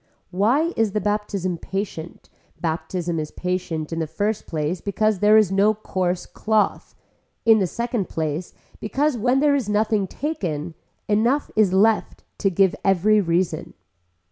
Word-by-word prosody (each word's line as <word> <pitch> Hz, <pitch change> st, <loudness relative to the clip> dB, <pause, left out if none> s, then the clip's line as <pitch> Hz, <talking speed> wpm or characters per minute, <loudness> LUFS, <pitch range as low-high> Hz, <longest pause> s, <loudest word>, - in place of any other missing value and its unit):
Why 255 Hz, -, +2 dB
is 220 Hz, -3 st, +1 dB
the 210 Hz, -, +1 dB
baptism 205 Hz, -4 st, -2 dB
patient, 190 Hz, -4 st, -5 dB, 0.3 s
baptism 170 Hz, 0 st, -2 dB
is 155 Hz, -1 st, -4 dB
patient 175 Hz, -3 st, -3 dB
in 165 Hz, -, -2 dB
the 160 Hz, -, -1 dB
first 205 Hz, +6 st, -2 dB
place 160 Hz, +2 st, -2 dB
because 210 Hz, 0 st, 0 dB
there 210 Hz, +2 st, +6 dB
is 210 Hz, -4 st, +4 dB
no 200 Hz, +3 st, +3 dB
coarse 185 Hz, -4 st, -2 dB
cloth, 215 Hz, -1 st, -1 dB, 0.5 s
in 225 Hz, -1 st, +6 dB
the 190 Hz, -, +1 dB
second 235 Hz, 0 st, -3 dB
place 160 Hz, +2 st, -3 dB, 0.2 s
because 280 Hz, +6 st, 0 dB
when 245 Hz, +4 st, +2 dB
there 295 Hz, -1 st, +4 dB
is 265 Hz, -7 st, 0 dB
nothing 210 Hz, -1 st, +1 dB
taken 175 Hz, -, -4 dB, 0.3 s
enough 235 Hz, +7 st, +1 dB
is 215 Hz, -4 st, +4 dB
left 210 Hz, +3 st, +2 dB, 0.2 s
to 195 Hz, -, +2 dB
give 190 Hz, 0 st, +3 dB
every 200 Hz, +3 st, +3 dB
reason. 175 Hz, 0 st, -1 dB
200 Hz, 145 wpm, -23 LUFS, 175-220 Hz, 0.5 s, there